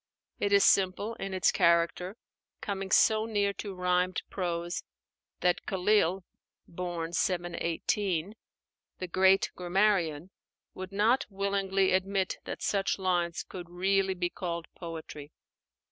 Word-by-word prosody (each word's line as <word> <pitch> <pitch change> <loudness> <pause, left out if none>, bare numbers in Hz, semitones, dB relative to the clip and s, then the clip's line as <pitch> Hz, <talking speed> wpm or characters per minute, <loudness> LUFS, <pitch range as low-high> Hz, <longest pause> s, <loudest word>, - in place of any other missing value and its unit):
It 205 - 0
is 200 -1 +6
simple 195 +3 +2
in 195 - -4
its 185 -1 +2
character; 170 +4 +2 0.4
coming 195 -2 -4
so 220 +2 +4
near 205 -2 +1
to 200 -1 -6
rhymed 180 0 0
prose 175 -2 -3 0.6
that 180 -1 +2
Khalíl 190 -1 +2 0.4
(born 170 -1 -4
718), 175 +1 -1 0.6
the 185 - -5
great 190 +2 +3
grammarian, 180 -3 +1 0.4
would 185 0 -7
not 215 +6 +2
willingly 195 -1 0
admit 190 0 0
that - - -6
such 195 -1 0
lines 175 -3 0
could 175 -2 -9
really 190 +2 +1
be 175 -1 -2
called 170 -2 -4
poetry. 160 -3 -8
185 Hz, 115 wpm, -29 LUFS, 175-195 Hz, 0.6 s, is